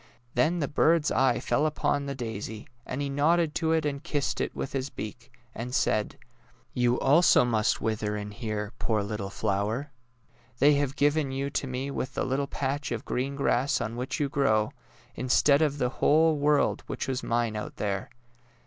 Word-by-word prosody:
Then 155 Hz, +8 st, +2 dB
the 150 Hz, -4 st, -1 dB
bird's 155 Hz, +2 st, +3 dB
eye 135 Hz, 0 st, +3 dB
fell 150 Hz, +2 st, +1 dB
upon 145 Hz, -2 st, -1 dB
the 140 Hz, -, -3 dB
daisy, 110 Hz, -3 st, -5 dB, 0.2 s
and 145 Hz, -, -3 dB
he -, -, -1 dB
nodded 150 Hz, +3 st, +2 dB
to 160 Hz, -2 st, 0 dB
it 160 Hz, -1 st, +2 dB
and 140 Hz, -1 st, -2 dB
kissed 145 Hz, -2 st, -1 dB
it -, -, -3 dB
with -, -, -4 dB
his 135 Hz, 0 st, -2 dB
beak, 120 Hz, +2 st, -8 dB, 0.2 s
and 125 Hz, +2 st, -5 dB
said: 105 Hz, -1 st, +1 dB, 0.3 s
'' -, -, -34 dB
You 120 Hz, 0 st, +3 dB
also 150 Hz, -2 st, +5 dB
must 110 Hz, -3 st, +1 dB
wither 110 Hz, -1 st, -1 dB
in 105 Hz, 0 st, -5 dB
here, 105 Hz, -2 st, -4 dB
poor 110 Hz, -3 st, 0 dB
little 100 Hz, -1 st, -4 dB
flower. 105 Hz, +9 st, -2 dB, 0.7 s
They 145 Hz, +3 st, +5 dB
have 140 Hz, -1 st, 0 dB
given 145 Hz, -1 st, +2 dB
you 135 Hz, +1 st, -2 dB
to 140 Hz, -, -2 dB
me 130 Hz, +2 st, -3 dB
with 130 Hz, -1 st, -4 dB
the -, -, 0 dB
little 135 Hz, +2 st, -1 dB
patch 140 Hz, +1 st, -3 dB
of 115 Hz, -2 st, -3 dB
green 135 Hz, +3 st, -2 dB
grass 140 Hz, 0 st, +1 dB
on 110 Hz, +2 st, -3 dB
which 125 Hz, +6 st, -3 dB
you 145 Hz, -, +1 dB
grow, 110 Hz, -6 st, +1 dB, 0.4 s
instead 140 Hz, +3 st, +3 dB
of 145 Hz, -2 st, +1 dB
the 125 Hz, -3 st, +1 dB
whole 155 Hz, +4 st, +3 dB
world 150 Hz, 0 st, +2 dB
which -, -, -4 dB
was 130 Hz, -1 st, -2 dB
mine 115 Hz, -2 st, 0 dB
out 105 Hz, -, -5 dB
there 100 Hz, -2 st, -2 dB
135 Hz, 185 wpm, -28 LUFS, 115-145 Hz, 0.7 s, also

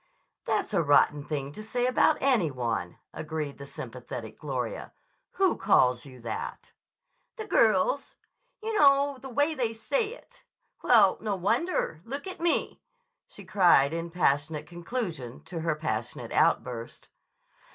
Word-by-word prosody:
"That's -, -, -1 dB
a -, -, +3 dB
rotten 145 Hz, -1 st, +3 dB
thing 140 Hz, -2 st, -4 dB
to 215 Hz, -, -9 dB
say 245 Hz, +3 st, -1 dB
about 255 Hz, +4 st, +3 dB
any 245 Hz, -, +3 dB
one," 115 Hz, -9 st, -3 dB, 0.2 s
agreed 155 Hz, -3 st, -5 dB
the 140 Hz, -, -8 dB
sympathetic 120 Hz, -3 st, -8 dB
Gloria. 130 Hz, -5 st, -4 dB, 0.4 s
"Who 385 Hz, -1 st, +2 dB
calls 130 Hz, -11 st, +3 dB
you 130 Hz, -2 st, -12 dB
that?" 115 Hz, -1 st, -6 dB, 0.6 s
"The 440 Hz, -, -6 dB
girls. -, -, +2 dB, 0.5 s
You 440 Hz, -1 st, -1 dB
know 280 Hz, -1 st, +4 dB
the 270 Hz, -, -8 dB
way 290 Hz, +6 st, +1 dB
they 240 Hz, -6 st, -1 dB
say 440 Hz, -, -1 dB
it! -, -, -20 dB, 0.4 s
Well, 210 Hz, -6 st, +5 dB
no 210 Hz, -2 st, -1 dB
wonder. 195 Hz, -, 0 dB
Look 275 Hz, -, -6 dB
at 375 Hz, -3 st, -7 dB
me!" 340 Hz, 0 st, 0 dB, 0.5 s
she -, -, -13 dB
cried 170 Hz, -7 st, +4 dB
in 165 Hz, +1 st, -3 dB
passionate 150 Hz, -2 st, 0 dB
conclusion 170 Hz, -, -5 dB
to 175 Hz, -3 st, -6 dB
her 165 Hz, -1 st, 0 dB
passionate 130 Hz, -9 st, -4 dB
outburst. 120 Hz, -2 st, 0 dB
175 Hz, 140 wpm, -28 LUFS, -, 0.6 s, Well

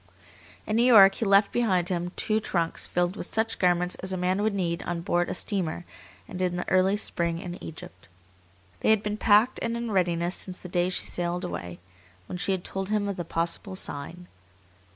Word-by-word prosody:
In 215 Hz, -, 0 dB
New 235 Hz, -, +4 dB
York 200 Hz, -6 st, +8 dB
he 225 Hz, -, -3 dB
left 200 Hz, 0 st, +4 dB
behind 190 Hz, -8 st, +1 dB
him 175 Hz, -1 st, -2 dB
two 215 Hz, 0 st, 0 dB
trunks 170 Hz, -6 st, -1 dB
filled 175 Hz, +1 st, 0 dB
with -, -, -5 dB
such 225 Hz, 0 st, -1 dB
garments 180 Hz, 0 st, +2 dB
as 190 Hz, -, -3 dB
a 185 Hz, -, -1 dB
man 185 Hz, +2 st, 0 dB
would 215 Hz, -1 st, 0 dB
need 170 Hz, -3 st, -1 dB
on 175 Hz, -1 st, -3 dB
board 175 Hz, +1 st, 0 dB
a -, -, -3 dB
steamer 180 Hz, -3 st, -2 dB, 0.4 s
and 185 Hz, -, -6 dB
in 180 Hz, -1 st, 0 dB
the 175 Hz, -, -4 dB
early 185 Hz, +2 st, +3 dB
spring 170 Hz, -5 st, -1 dB
in 175 Hz, +1 st, -7 dB
Egypt. 95 Hz, -, -10 dB, 0.7 s
They -, -, +1 dB
had 220 Hz, -1 st, +4 dB
been 210 Hz, 0 st, -2 dB
packed 215 Hz, +4 st, +4 dB
and 235 Hz, 0 st, -1 dB
in 235 Hz, -1 st, -4 dB
readiness 175 Hz, -2 st, +1 dB
since 185 Hz, -1 st, -3 dB
the 180 Hz, -, -10 dB
day 175 Hz, +1 st, +1 dB
she 185 Hz, -, -2 dB
sailed 175 Hz, +1 st, -2 dB
away, 90 Hz, -, -5 dB, 0.5 s
when 180 Hz, -, -6 dB
she 195 Hz, -, +1 dB
had 185 Hz, -2 st, -1 dB
told 195 Hz, 0 st, -4 dB
him 210 Hz, -1 st, 0 dB
of 200 Hz, -, -2 dB
the 175 Hz, -, -4 dB
possible 170 Hz, +4 st, -2 dB
sign. 175 Hz, +1 st, -4 dB
185 Hz, 205 wpm, -27 LUFS, 175-205 Hz, 0.7 s, York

